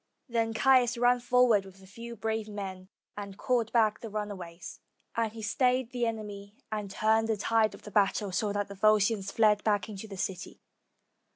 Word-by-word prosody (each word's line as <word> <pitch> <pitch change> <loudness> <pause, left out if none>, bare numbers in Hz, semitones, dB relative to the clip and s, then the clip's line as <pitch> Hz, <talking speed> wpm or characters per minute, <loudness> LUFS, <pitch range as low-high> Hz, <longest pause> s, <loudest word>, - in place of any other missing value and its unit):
301 230 -1 +1
ROME 225 - -5
Then 220 - -5
Caius 255 -3 +5
ran 245 +1 +4
forward 245 -4 +4
with 195 0 -15
a - - -14
few 230 +4 -9
brave 220 0 -2
men, 190 -3 -7 0.3
and 200 -1 -7
called 235 -3 0
back 220 -3 +3
the 225 - -7
runaways; 195 -5 -6 0.4
and 225 -1 0
he 220 0 -9
stayed 250 +3 +1
the 245 -2 0
enemy, 205 -2 -6 0.2
and 210 -2 -3
turned 220 +3 +2
the 220 - +1
tide 220 +1 +2
of - - -16
the 210 - -10
battle, 200 0 +1
so 205 +3 0
that 205 0 -1
the 200 - -8
Volscians 210 0 +2
fled 210 -2 +3
back 210 0 +1
into 210 +1 -7
the 195 -2 -9
city. 185 -1 -4
215 Hz, 195 wpm, -29 LUFS, 200-230 Hz, 0.4 s, Caius